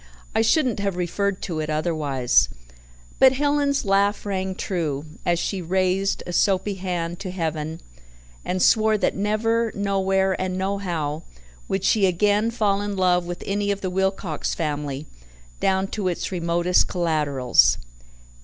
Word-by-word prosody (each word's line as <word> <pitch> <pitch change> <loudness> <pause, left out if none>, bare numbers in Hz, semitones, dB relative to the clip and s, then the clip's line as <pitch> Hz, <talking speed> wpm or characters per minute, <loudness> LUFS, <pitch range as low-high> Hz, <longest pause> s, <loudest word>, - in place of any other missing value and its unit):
I - - +2
shouldn't 245 -1 +2
have 200 -2 -1
referred 190 +2 -1
to 165 -4 -3
it 155 0 -3
otherwise." 150 -5 +1 0.7
But 265 -1 +7
Helen's 285 0 +1
laugh 200 +1 +2
rang 190 -1 -2
true, 160 -7 -2 0.2
as 175 0 +3
she 190 +2 -2
raised 185 +2 0
a 175 - -5
soapy 195 +2 +2
hand 175 -3 -3
to 195 -1 -5
heaven 160 -3 -3 0.6
and 185 0 -1
swore 220 -1 +4
that - - 0
never, 225 +3 0
nowhere 195 -1 +1
and 185 0 -2
nohow, 175 -6 -2 0.5
would 195 -1 -2
she 205 -3 +3
again 205 +4 +2
fall 205 -4 +1
in 205 -1 -3
love 180 -1 +2
with 175 0 -6
any 205 +1 -1
of 200 0 -1
the 185 - -2
Wilcox 190 -4 -1
family, 145 -2 -3 0.5
down 190 0 +1
to 205 -4 -2
its 180 +1 -2
remotest 175 0 +2
collaterals. 150 -8 +2
190 Hz, 145 wpm, -23 LUFS, 170-200 Hz, 0.7 s, But